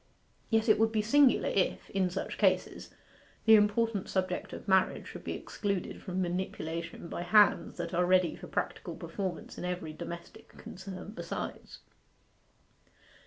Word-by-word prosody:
Yet 225 0 +2
it 215 - +5
would 220 0 +3
be 215 -1 +1
singular 280 +4 +4
if, 195 - 0
in 190 -2 +1
such 185 +2 -4
cases, - - +1 0.6
the 220 - +8
important 210 -1 +3
subject 185 -1 -1
of - - -8
marriage 190 -1 +3
should - - -9
be - - -3
excluded 200 -3 -3
from 185 -1 -4
manipulation 170 -2 -4
by 170 - -5
hands 205 +4 +4
that - - -4
are 175 +1 +2
ready 185 -1 +3
for - - -10
practical - - -3
performance 190 -4 -5
in - - -5
every 180 -3 -3
domestic 170 +2 -8
concern 190 +1 -8
besides. 225 - -6
190 Hz, 145 wpm, -31 LUFS, 180-210 Hz, 0.6 s, the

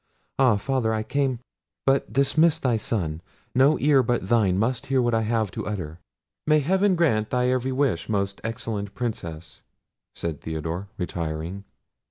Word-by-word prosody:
—ah! 130 -5 +5
Father, 115 0 0
I 110 - -1
came—but 135 +1 -2
dismiss 155 +4 +3
thy 130 -7 +1
son. 90 -8 -2 0.3
No 135 +4 +4
ear 145 -2 +4
but 120 -5 -1
thine 105 -6 +3
must 115 +4 -1
hear 135 0 +2
what 120 -1 +2
I 115 - +2
have 110 -3 0
to - - -5
utter." 90 -6 -5 0.5
"May 155 0 +5
heaven 190 +5 +2
grant 115 -11 +2
thy 125 0 +1
every 130 +1 0
wish, 130 -11 0
most 100 -2 -1
excellent 110 -3 -4
Princess!" 85 -9 -5 0.5
said 80 -3 -4
Theodore 80 +4 -4
retiring. 85 +1 -4
115 Hz, 150 wpm, -25 LUFS, 95-130 Hz, 0.5 s, ah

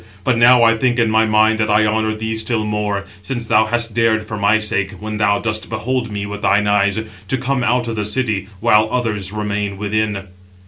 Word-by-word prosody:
But 125 +4 +2
now 120 +1 +6
I 115 0 +5
think 120 +1 0
in 115 -2 +2
my 110 0 +3
mind 110 +1 +3
that 110 0 0
I 105 +1 +3
honour 110 0 0
thee 110 +1 -3
still 110 0 -1
more, 105 -2 -2 0.2
since 120 +1 -5
thou 110 -1 +3
hast 115 0 -1
dared 110 -1 +1
for 110 - -6
my 105 +1 +3
sake, 100 -2 -2
when 105 +2 -6
thou 100 -1 +2
dost 110 +1 -3
behold 120 +2 -2
[me] 100 -1 -4
with 105 0 -7
thine 105 +2 +2
eyes, 100 0 +2 0.3
to 130 - 0
come 130 0 -1
out 120 +1 +1
of 115 - -3
the 105 - -1
city; 105 -3 -2
while 110 -1 +3
others 105 -6 -2
remain 105 -1 -3
within." 105 -1 -2
110 Hz, 215 wpm, -18 LUFS, 105-115 Hz, 0.3 s, now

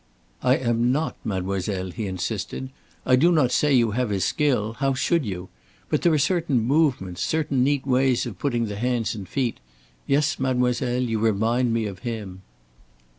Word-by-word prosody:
"I 130 +1 +4
am 120 -1 +1
not, 150 +4 -1
mademoiselle," 95 -1 -2
he 110 +2 -4
insisted. 95 +7 -4 0.3
"I 130 - +5
do 165 +7 +4
not 150 -7 +3
say 150 +3 +2
you 115 -3 +3
have 125 +1 -1
his 95 -3 0
skill 125 -7 +1
how 135 -1 +1
should 145 +1 +1
you? 90 -2 -5 0.4
But - - +1
there 170 - +4
are 155 - +3
certain 150 -2 +1
movements, 120 - +1
certain 145 -5 +1
neat 140 0 +1
ways 130 -1 +2
of 105 -7 -7
putting 120 -5 0
the 105 -2 -5
hands 120 -1 0
and 100 -4 -8
feet. 125 -4 -1 0.5
Yes, 145 +2 +1
mademoiselle, 125 -1 0
you 115 -3 -1
remind 115 +3 +1
me 115 -1 0
of 100 -3 -6
him." 105 -6 -6
120 Hz, 175 wpm, -24 LUFS, 105-135 Hz, 0.5 s, I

